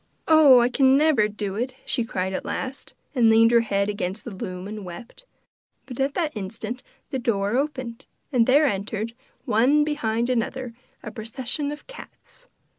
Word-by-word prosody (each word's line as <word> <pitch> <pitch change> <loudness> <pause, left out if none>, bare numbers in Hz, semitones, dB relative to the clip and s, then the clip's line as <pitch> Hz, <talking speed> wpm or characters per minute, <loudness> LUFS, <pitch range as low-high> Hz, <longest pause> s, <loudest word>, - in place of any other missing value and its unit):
'Oh, 305 -5 +7
I 240 - +4
can 265 +1 +4
never 290 -8 +3
do 205 -2 -5
it!' 245 +5 -3
she 240 - 0
cried 190 -4 -3
at - - -3
last, 265 +1 -5 0.2
and 240 -5 +4
leaned 225 +1 +6
her 235 - +6
head 200 -3 0
against 205 -1 -3
the 235 - -6
loom 185 0 -6
and 210 0 -7
wept; 230 - -11 0.6
but 250 -1 -9
at 275 +1 0
that 320 -6 -1
instant 220 +5 -5 0.3
the 265 - -1
door 205 -2 0
opened, 260 -4 -3 0.2
and 240 -4 +3
there 285 +4 +5
entered, 215 0 -2 0.3
one 255 +6 +3
behind 240 -6 -1
another, 250 0 -2 0.3
a - - -6
procession 250 +6 -3
of 295 0 -9
cats. - - -14
235 Hz, 170 wpm, -24 LUFS, 210-270 Hz, 0.6 s, Oh